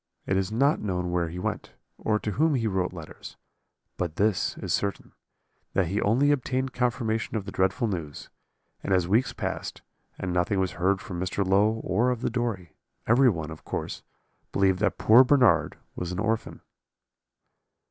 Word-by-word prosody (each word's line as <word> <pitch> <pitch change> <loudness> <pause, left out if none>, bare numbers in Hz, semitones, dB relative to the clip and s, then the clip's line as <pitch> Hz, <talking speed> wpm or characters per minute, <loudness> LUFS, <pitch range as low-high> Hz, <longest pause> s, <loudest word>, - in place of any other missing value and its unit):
It 95 - 0
is 95 +1 0
not 140 +7 +2
known 90 -3 -2
where 85 -1 0
he 85 - -7
went, 105 +3 -4 0.3
or 105 - +1
to 105 - -3
whom 155 +6 +2
he 115 -3 0
wrote 95 -4 0
letters; 80 -4 -10 0.6
but 85 -3 -3
this 105 -2 +1
is - - -3
certain, 100 -1 -2 0.6
that 90 -4 +1
he 100 +3 -1
only 130 +8 +3
obtained 130 -1 -1
confirmation 115 -3 -1
of 100 - -4
the 100 - -6
dreadful 95 +5 +1
news, 85 -8 -5 0.5
and 95 - +2
as 90 -2 +1
weeks 110 +7 +2
passed, - - -5 0.3
and 90 -1 -3
nothing 90 +3 +1
was 95 -1 0
heard 95 +2 0
from 90 -2 -6
Mr. 95 +2 -1
Low 100 +3 +4
or 120 +3 +1
of 125 -2 -2
the 125 - -1
Dory, 115 -8 -3 0.3
every 125 +3 +5
one, 80 -6 -3
of 80 - -10
course, - - -4 0.5
believed 95 -2 +2
that - - 0
poor 115 +4 +7
Bernard 130 -3 +3 0.2
was 90 0 -4
an 90 - -4
orphan. 110 +1 -2
100 Hz, 175 wpm, -26 LUFS, 90-120 Hz, 0.6 s, poor